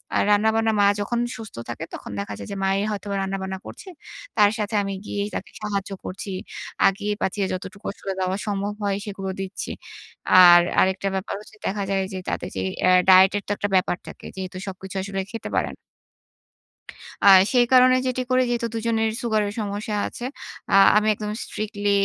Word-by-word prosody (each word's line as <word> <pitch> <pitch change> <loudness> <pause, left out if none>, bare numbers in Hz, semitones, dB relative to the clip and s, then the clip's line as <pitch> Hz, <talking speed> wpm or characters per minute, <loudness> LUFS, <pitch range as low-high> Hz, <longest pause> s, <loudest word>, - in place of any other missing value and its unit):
আর - - +3
রান্নাবান্না 220 +2 +3
মা 205 - +5 0.2
যখন 235 +3 -1 0.2
সুস্থ 220 - -10
থাকে 120 - -5
তখন - - -7
দেখা 200 0 -4
যায় - - -8
যে, 200 - -4
মাই 195 0 +2
হয়তোবা 200 -1 -4
রান্নাবান্না 190 0 -3
করছে। 385 - -10 0.5
তার 205 -1 +6
সাথে 210 +1 -2
আমি 195 0 -3
গিয়েই 205 0 -3
তাকে - - -5
সাহায্য 200 -1 -3
করছি। 195 +1 -6 0.6
আগিয়ে-পাছিয়ে 205 0 -1
যতটুকু 190 +2 -7
আসলে 195 - -6
দেওয়া 185 +1 -1
সম্ভব 205 0 -2
হয় 200 -1 0
সেগুলো 195 -2 -5
দিচ্ছি। 195 0 -5 0.7
আর 175 0 +9 0.2
আরেকটা 190 +1 +1
ব্যাপার 190 +2 -3
হচ্ছে 215 +1 -16
দেখা 200 +1 -1
যায় 195 -1 +1
যে 185 - -4
তাদের - - -3
যে 95 - -1 0.2
অ্যা 185 - +4 0.2
ডায়েট 190 +1 +8
এর 205 - -5
তো - - -3
একটা 205 - -2
ব্যাপার 185 -1 +2
থাকে। - - -11
যেহেতু 185 -1 -6
সবকিছু 190 0 -8
আসলে 195 0 -3
খেতে 230 - -6
পারেন - - -1 1.5
আ - - +5 0.3
সেই 245 -1 +5
কারণে 255 0 +7
যেটি 255 0 -1
করি 255 - +4
যেহেতু 235 -1 0
২ - - -2
জনের 225 -1 +1
সুগারের 215 -3 0
সমস্যা 210 0 -3
আছে। 240 - -7 0.5
আ - - 0 0.2
আমি 215 0 +2
একদম 210 0 -4
স্ট্রিক্টলি 205 -1 -3
200 Hz, 175 wpm, -23 LUFS, 190-215 Hz, 1.5 s, আর